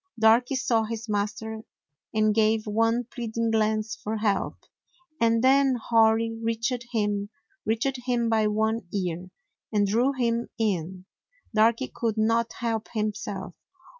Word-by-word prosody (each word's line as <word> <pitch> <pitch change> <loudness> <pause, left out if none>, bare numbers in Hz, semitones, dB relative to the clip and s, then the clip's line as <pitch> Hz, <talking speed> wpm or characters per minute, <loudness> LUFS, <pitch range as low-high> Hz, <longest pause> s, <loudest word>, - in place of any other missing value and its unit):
Darky 230 +4 +4
saw 230 -3 +1
his 225 +1 -5
master 215 +1 -2 0.5
and 215 -1 +2
gave 220 0 +2
one 225 +3 +1
plead 235 -4 -6
ing 230 -1 +1
glance 215 0 +1
for 220 +1 -4
help; 205 -3 0 0.6
and 230 0 +3
then 270 0 +5
Hori 225 -1 +3
reached 230 +2 -2
him 205 -3 -1 0.2
— 390 -1 -41
reached 240 +5 0
him 240 -2 +1
by 220 -1 +2
one 220 -1 0
ear 180 -2 -3 0.2
— - - -59
and 205 -2 +2
drew 235 +7 +2
him 235 -2 -1
in. 185 -4 -2 0.5
Darky 225 +4 +3
could 225 -2 -1
not 230 +1 +2
help 225 -2 -1
himself. 210 -4 -3
225 Hz, 140 wpm, -26 LUFS, 215-230 Hz, 0.6 s, then